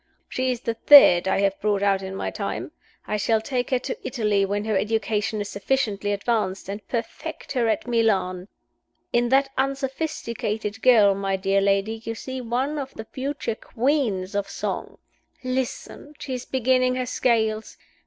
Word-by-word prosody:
She 255 0 -1
is 245 -2 -4
the 230 - -1
third 225 -9 +7
I 195 - +2
have 195 -1 0
brought 205 -1 +1
out 195 -1 +2
in 190 0 -6
my - - -3
time. - - -4 0.3
I 210 - -1
shall 220 +2 +2
take 245 +2 -2
her 255 - +2
to 260 - -4
Italy 210 -5 +1
when 205 +1 -2
her 220 -1 0
education 215 +1 0
is 205 - -4
sufficiently 205 -2 -1
advanced, 200 -2 -1
and 205 +1 -6
perfect 230 -2 -5
her 245 -4 +1
at 220 -2 0
Milan. 195 -6 +1 0.7
In 240 0 +2
that 270 +1 +3
unsophisticated 260 -6 -2
girl, 220 -6 +6
my 195 0 -1
dear 195 +1 +1
lady, 200 +3 +1
you 225 0 -4
see 260 +3 -6
one 255 +5 -1
of 270 -1 -6
the 220 - -7
future 270 -1 -3
Queens 225 -6 -1
of 200 -1 -2
Song. - - -4 0.5
Listen! 260 +3 -4
She 265 - -5
is 250 -1 -4
beginning 255 0 +2
her 255 0 -1
scales. 220 -3 0
225 Hz, 165 wpm, -24 LUFS, 200-255 Hz, 0.7 s, third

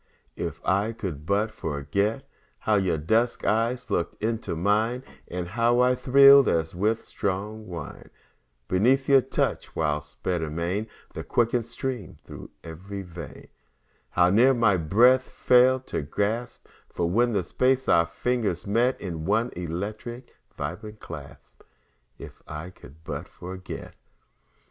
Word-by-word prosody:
If - - -5
I 100 +4 +1
could 85 -9 -6
but 105 +2 +1
forget 100 - -2 0.3
How 110 - +1
your 95 -5 +2
dusk 110 +10 +1
eyes 115 +1 0
look 85 -3 -1
into 115 -4 -2
mine, 110 +8 +1 0.2
And 90 -1 -5
how 120 +3 +2
I 125 0 +4
thrilled 140 +2 +7
as 80 -1 0
with 110 +5 0
strong 105 +3 -3
wine 85 -5 -8 0.6
Beneath 125 +9 +2
your 135 -1 +6
touch; 130 - -2
while 75 -2 0
sped 80 +4 -4
amain 85 +7 -2 0.3
The - - -5
quickened 120 -1 +1
stream 120 -4 -5
thro' - - -10
ev'ry 95 +5 -7
vein; 85 -2 -10 0.6
How 90 0 +3
near 125 +6 +5
my 115 -5 +4
breath 115 +10 +5
fell 130 0 +4
to - - -5
a - - 0
gasp, 105 +11 -3 0.3
When 110 +8 +2
for - - +3
a - - -2
space 130 +8 +1
our 85 0 +4
fingers 100 +1 -1
met 120 +5 +1
In 85 -5 -5
one 115 +7 +1
electric 105 +8 -5 0.2
vibrant 105 +9 -6
clasp, 75 -4 -11 0.6
If - - -11
I 75 +4 -7
could 75 -1 -16
but - - -5
forget. 90 +1 -8
105 Hz, 140 wpm, -26 LUFS, 85-120 Hz, 0.6 s, thrilled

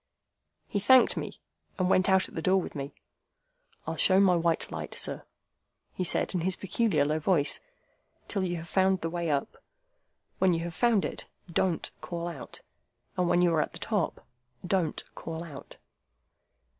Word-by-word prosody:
He 205 - -1
thanked 255 +5 +6
me, - - -5 0.4
and 185 -2 +1
went 185 0 +3
out 190 0 +4
at - - -16
the 165 - -3
door 190 +3 +3
with - - -5
me. 140 -1 -6 0.9
"I'll - - -3
show 190 0 +4
my 190 -2 +5
white 170 -1 +1
light, - - -5
sir," - - -2 0.7
he 185 - -2
said, 180 - 0
in 180 - 0
his 185 +2 +1
peculiar 195 -7 +1
low 155 +2 0
voice, 155 -3 +2 0.7
"till 195 -3 -1
you 175 -1 -1
have 165 +1 -8
found 190 0 +2
the 165 - -2
way 170 -1 -2
up. 140 -2 -1 0.8
When 190 -2 +4
you 165 - -2
have 170 0 -4
found 230 +1 +3
it, - - -5 0.3
don't 175 -2 0
call 170 -1 -4
out! 165 -7 -8 0.5
And 180 -1 +1
when 175 0 +4
you 175 -1 +4
are 155 - +3
at - - -3
the - - -5
top, 205 -7 -2 0.4
don't 180 -4 0
call 165 0 -6
out!" 150 -5 -10
175 Hz, 175 wpm, -29 LUFS, 165-190 Hz, 0.9 s, thanked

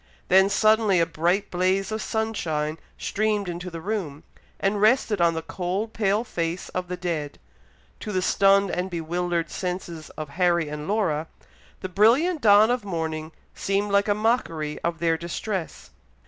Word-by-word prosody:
Then 190 +1 +6
suddenly 215 -2 +3
a 165 - +4
bright 175 +5 0
blaze 185 +3 +1
of 220 0 -2
sunshine 165 -9 -2 0.2
streamed 210 -1 -1
into 175 +1 -5
the 165 -1 -7
room, 175 -7 -4 0.4
and 200 +1 0
rested 215 -3 +3
on 170 -1 +3
the 160 - -3
cold 190 +6 -3
pale 210 0 +1
face 170 -5 -3
of 180 0 -4
the 180 0 -4
dead. 165 -5 -3 0.6
To 215 - -5
the 185 -2 0
stunned 195 0 +4
and 180 +1 -2
bewildered 170 0 -2
senses 180 -3 -5
of 155 -2 -5
Harry 170 -1 +1
and 150 +1 -6
Laura, 170 -7 0 0.5
the - - -3
brilliant 255 - +3
dawn 210 +1 +6
of 245 -2 -1
morning 160 -4 -3 0.2
seemed 200 +1 -1
like 200 +1 +3
a 205 - +2
mockery 165 -9 -1
of 170 -1 -1
their 165 -1 +1
distress. 175 -1 -5
185 Hz, 160 wpm, -25 LUFS, 165-210 Hz, 0.6 s, Then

